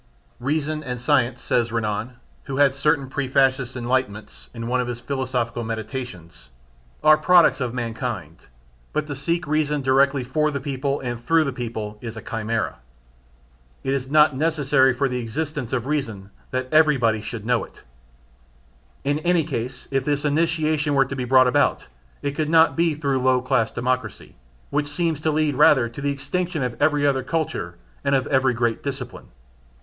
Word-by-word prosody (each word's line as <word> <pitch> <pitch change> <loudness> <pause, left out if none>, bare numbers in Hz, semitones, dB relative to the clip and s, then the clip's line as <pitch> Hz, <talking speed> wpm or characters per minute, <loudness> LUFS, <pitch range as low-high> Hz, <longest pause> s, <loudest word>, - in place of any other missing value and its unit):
"Reason 155 +3 -1
and 125 -3 -4
science" 130 -2 +1
says 120 -1 +1
Renan 110 +1 -2 0.3
(who 135 -1 -4
had 140 -2 +4
certain 140 0 +1
pre 135 0 -3
fascist 130 -1 +2
enlightenments) 120 -4 -3
in 115 -1 -7
one 125 +1 +1
of 125 - -3
his 120 -1 -4
philosophical 125 -2 -2
meditations, 110 - -7 0.5
"are 155 0 +6
products 170 -5 +5
of 125 -1 -2
mankind, 115 - -5 0.5
but 155 - 0
to 145 -1 -5
seek 165 +6 -1
reason 150 -1 0
directly 135 +1 +3
for 150 +5 0
the 140 -2 -3
people 140 +1 -2
and 120 -2 -4
through 165 +6 +3
the 140 -3 -3
people 110 -4 -5
is 115 -2 -7
a - - -6
chimera. 110 0 -2 1.1
It 135 - 0
is 135 -1 -2
not 150 -1 +5
necessary 140 -3 +3
for 135 +3 0
the 125 -1 -2
existence 140 +2 -4
of 125 -2 -1
reason 115 -10 -3 0.2
that 130 0 -2
everybody 135 -9 +4
should 110 -1 -7
know 120 0 +1
it. - - -14 1.2
In 145 +2 0
any 175 0 +2
case 125 0 -5
if 135 -1 +1
this 145 +1 -1
initiation 155 -1 +1
were 135 0 +4
to 135 - -6
be 125 -2 -3
brought 130 +1 +5
about 125 - +2 0.4
it 145 - 0
could 150 +2 -2
not 165 0 +5
be 165 -2 +2
through 140 -3 0
low 130 0 +3
class 125 -3 +1
democracy, 125 -4 -3 0.4
which 145 0 0
seems 160 0 -1
to 155 - +1
lead 155 -1 +1
rather 135 -3 +5
to 120 +5 -9
the 145 - 0
extinction 170 +3 -2
of 125 -2 -2
every 145 -1 +3
difficult 135 -2 +1
culture 140 - -2 0.3
and 140 - +2
of 130 - +1
every 130 -2 +2
great 115 -1 0
discipline. 135 -3 -6
135 Hz, 175 wpm, -23 LUFS, 120-150 Hz, 1.2 s, are